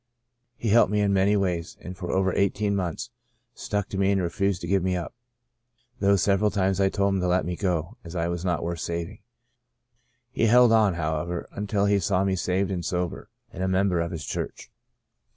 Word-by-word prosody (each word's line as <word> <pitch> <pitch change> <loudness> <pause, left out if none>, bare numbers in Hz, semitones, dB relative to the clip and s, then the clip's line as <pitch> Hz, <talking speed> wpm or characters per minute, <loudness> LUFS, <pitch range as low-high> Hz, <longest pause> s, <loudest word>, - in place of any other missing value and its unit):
He 115 - -2
helped 110 -2 +5
me 105 - +1
in 100 -1 +2
many 100 +2 +3
ways 90 -4 -2
and 90 - -8
for 90 -1 -5
over 95 -1 +1
eighteen 100 +1 +1
months 95 +6 -3 0.4
stuck 105 -3 -3
to 95 - -4
me 100 0 +3
and 100 - +2
refused 95 +2 -1
to 85 - -5
give 95 +1 +2
me 90 +1 0
up, 85 -2 -4 0.9
though 100 0 +4
several 100 +2 +2
times 95 -1 0
I 95 - +4
told 100 0 +1
him 95 - 0
to 90 - 0
let 90 +1 +2
me 90 +1 -3
go 90 +3 -2
as 85 +1 -9
I 85 -1 0
was 85 0 -3
not 85 -3 -1
worth 85 0 -3
saving. 85 +1 -4 1.1
He 115 - +1
held 120 +1 +6
on, 110 -5 +4
however, 80 +1 -2
until 100 0 -1
he 100 0 +3
saw 95 +1 +1
me 95 -1 +1
saved 95 +2 0
and 90 -2 -3
sober, 90 +1 -3 0.2
and 90 - -6
a 95 - 0
member 95 -2 +1
of 85 - -2
his 80 -3 -6
church. - - -5
95 Hz, 205 wpm, -25 LUFS, 85-100 Hz, 1.1 s, held